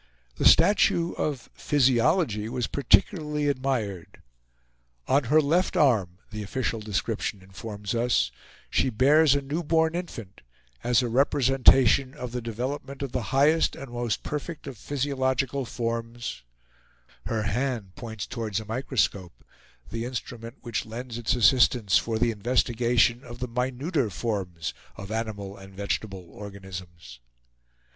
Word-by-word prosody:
The - - -1
statue 175 -4 +4
of 145 -5 -3
Physiology 125 - +2
was 125 -1 -1
particularly 150 - +2
admired. 130 -10 -2 0.9
"On 135 0 +3
her 150 +6 +5
left 165 +5 +1
arm," 105 - +3
the 105 -1 -5
official 115 +2 -2
description 105 -1 -3
informs 100 +1 -6
us, 115 - +2 0.4
"she 130 - +2
bears 140 +5 +5
a 140 - -1
new 145 +5 -2
born 160 0 +2
infant, 120 - -6 0.4
as 125 +1 +3
a - - 0
representation 135 0 +4
of 125 -4 -6
the 125 0 -3
development 130 +5 -4
of 135 - -4
the 125 - -1
highest 150 +4 +3
and 135 -3 -9
most 120 -2 -2
perfect 150 +2 -5
of 135 -2 -7
physiological 135 +1 -1
forms; 115 0 -4 0.9
her 110 -2 -1
hand 115 -4 -2
points 110 -2 -6
towards 110 -4 -3
a 110 - -8
microscope, 110 -6 -2 0.5
the 115 0 -3
instrument 120 -1 -6
which 120 - -3
lends 120 +1 -6
its 120 +1 +1
assistance 120 -5 +4
for 115 +4 -2
the 115 +1 +2
investigation 120 +2 +2
of 120 -2 -9
the 125 - -4
minuter 130 - -1
forms 90 -5 -3 0.2
of 100 +2 -8
animal 105 -3 -4
and 95 -1 -13
vegetable 100 -1 -3
organisms." 90 -9 -9
120 Hz, 130 wpm, -26 LUFS, 105-135 Hz, 0.9 s, her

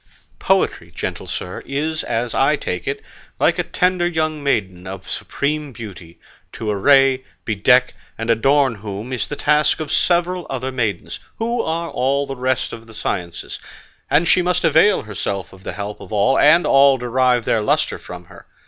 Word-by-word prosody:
Poetry, - - +1
gentle - - -5
sir, 90 - -5
is, 155 +3 -2
as 115 +1 -2
I - - +3
take - - -4
it, - - -3 0.4
like - - +2
a - - +2
tender 180 -1 +1
young 155 -3 -1
maiden 95 -10 -1
of 95 0 -8
supreme 150 0 -2
beauty, 95 -7 -10 0.3
to 110 -2 -3
array, 135 +5 +4 0.2
bedeck, 125 +4 +3 0.2
and 115 +1 0
adorn 135 +3 +3
whom 105 +3 -7
is 125 - -2
the 145 - -5
task 150 +1 +2
of 155 -2 -4
several 175 0 +1
other 130 0 -3
maidens, 115 -6 -3 0.2
who 235 +1 -1
are 165 +1 -3
all 140 +3 0
the 135 - -6
rest 130 0 -1
of 115 0 -10
the 110 - -13
sciences; 85 -4 -4 0.5
and 150 +5 +3
she 185 - +5
must 180 0 0
avail 165 +6 +4
herself 100 -2 -4
of 95 - -15
the - - -6
help 105 0 -6
of - - -12
all, 110 +6 +3
and 170 +4 +6
all 135 0 +5
derive 125 -1 +1
their 110 - +2
lustre 105 - 0
from 90 0 -10
her. - - -16
130 Hz, 175 wpm, -20 LUFS, 105-150 Hz, 0.5 s, and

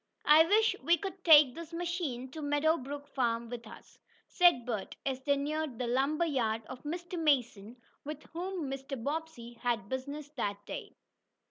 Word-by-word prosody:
"I 305 +2 +8
wish 440 +4 +4
we 340 +6 +4
could 385 -1 -6
take 295 -6 +8
this 335 +2 -9
machine 335 -7 -3
to 315 - -7
Meadow 290 +2 +2
Brook 285 +2 -7
Farm 235 -4 -1
with 235 -2 -7
us," - - -14 0.3
said 345 -10 +4
Bert, 220 -5 -4
as 265 -1 -2
they 280 +1 +2
neared 295 -2 -2
the 250 - -2
lumber 275 +7 +1
yard 225 -7 0
of 255 +2 -9
Mr. 345 +3 -5
Mason, 245 -7 0 0.3
with 300 +1 -7
whom 355 -2 -3
Mr. 270 0 -5
Bobbsey 290 -5 -4
had 230 -5 -1
business 280 +3 -5
that 205 -9 -4
day. - - -7
285 Hz, 165 wpm, -31 LUFS, 245-320 Hz, 0.3 s, I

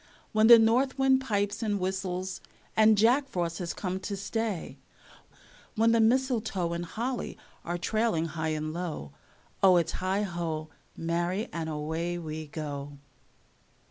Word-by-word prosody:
When 215 0 +4
the 235 0 +11
north 245 +5 +3
wind 265 -1 +4
pipes 205 -3 -1
and 205 -3 0
whistles, 185 0 -3 0.3
and 220 -1 +6
Jack 250 +6 +4
Frost 170 -6 -2
has 175 -2 -3
come 185 -1 -3
to 200 +1 -4
stay, 205 -2 -3 1.0
When 225 +1 +4
the 230 - +4
mistletoe 225 -7 +1
and 170 0 -3
holly 240 +9 -4 0.3
are 175 +1 -3
trailing 215 -2 0
high 160 0 -3
and 155 0 -4
low, 160 - -5 0.5
O, 185 -2 +7
its 170 - +1
heigho, 175 -5 -2 0.3
marry, 175 +6 -1
and 165 -1 -3
away 160 +3 -2
we 155 -2 -6
go. 145 -2 -5
185 Hz, 140 wpm, -29 LUFS, 165-220 Hz, 1.0 s, the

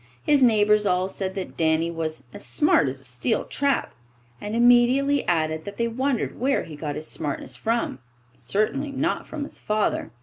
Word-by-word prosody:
His 290 -2 +3
neighbours 210 -3 +4
all 180 +1 +1
said 190 0 -4
that 190 -2 -5
Danny 160 +1 +1
was 160 -3 -4
"as - - -7
smart 120 +4 +3
as 135 +1 -4
a - - -11
steel 125 - -1
trap," 280 -1 0 0.5
and 210 +2 -4
immediately 245 +4 +4
added 160 -2 0
that 200 0 -7
they 235 - +1
wondered 255 +2 -1
where 270 +3 +1
he 155 - -9
got 145 -1 -4
his 155 - -6
smartness 140 -4 -4
from 225 - -1 0.3
certainly 215 - -1
not 280 +5 -1
from 310 -2 -5
his - - -9
father! 215 0 -1
205 Hz, 175 wpm, -24 LUFS, 155-245 Hz, 0.5 s, neighbours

